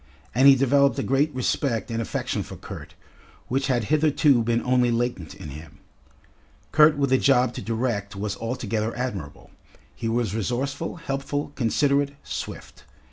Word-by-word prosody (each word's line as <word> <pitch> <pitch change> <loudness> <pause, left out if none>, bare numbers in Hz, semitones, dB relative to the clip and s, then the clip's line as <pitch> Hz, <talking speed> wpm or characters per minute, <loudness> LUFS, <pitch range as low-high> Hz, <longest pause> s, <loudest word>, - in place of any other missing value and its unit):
And 130 +4 +5
he 140 - +9
developed 140 +1 +3
a 135 - -1
great 140 +4 +2
respect 125 -2 -1
and 115 0 -1
affection 115 - -2
for - - -8
Kurt, - - -10 0.5
which 135 +2 0
had 125 -4 +1
hitherto 150 -4 +4
been 115 +1 0
only 125 -1 +3
latent 115 -8 -2
in 75 - -9
him. 75 +2 -11 0.9
Kurt 150 -1 +6
with 140 -2 +1
a 130 - +4
job 125 -3 +3
to - - -6
direct 110 -4 -2
was 100 0 -3
altogether 115 -1 -3
admirable; 100 - -5 0.4
he 115 - -3
was 115 -3 0
resourceful, 130 - -2
helpful, 145 -2 -3
considerate, 140 +3 +1
swift. - - -7
125 Hz, 150 wpm, -24 LUFS, 115-140 Hz, 0.9 s, he